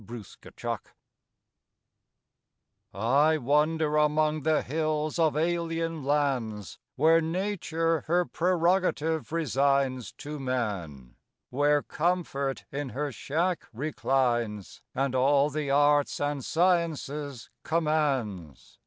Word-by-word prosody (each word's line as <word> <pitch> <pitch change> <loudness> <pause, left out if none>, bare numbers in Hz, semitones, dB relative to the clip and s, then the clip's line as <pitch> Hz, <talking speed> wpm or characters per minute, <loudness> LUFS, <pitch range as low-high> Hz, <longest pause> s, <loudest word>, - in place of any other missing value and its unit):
40 115 -4 -9
THE - - -12 2.4
WANDERER - - -25
I 140 +10 +3
wander 150 +3 +1
among 150 0 +2
the 155 +1 +1
hills 155 +2 -1
of 155 -3 +2
alien 165 -1 -1
lands 130 - -1 0.2
Where 160 +4 +4
Nature 165 -2 -1
her 175 +2 +2
prerogative 170 -3 +1
resigns 135 - +1
To 150 0 -7
Man; 95 - -4 0.3
where 145 +2 +2
Comfort 150 -5 -1
in 140 -1 -4
her 145 +3 -3
shack 165 +9 -2
reclines 120 -5 -1
And 135 0 0
all 140 +3 +3
the 150 -1 -3
arts 145 +1 +3
and 145 -2 -2
sciences 150 -7 -1
commands. 135 - -1
150 Hz, 100 wpm, -28 LUFS, 130-160 Hz, 2.4 s, Where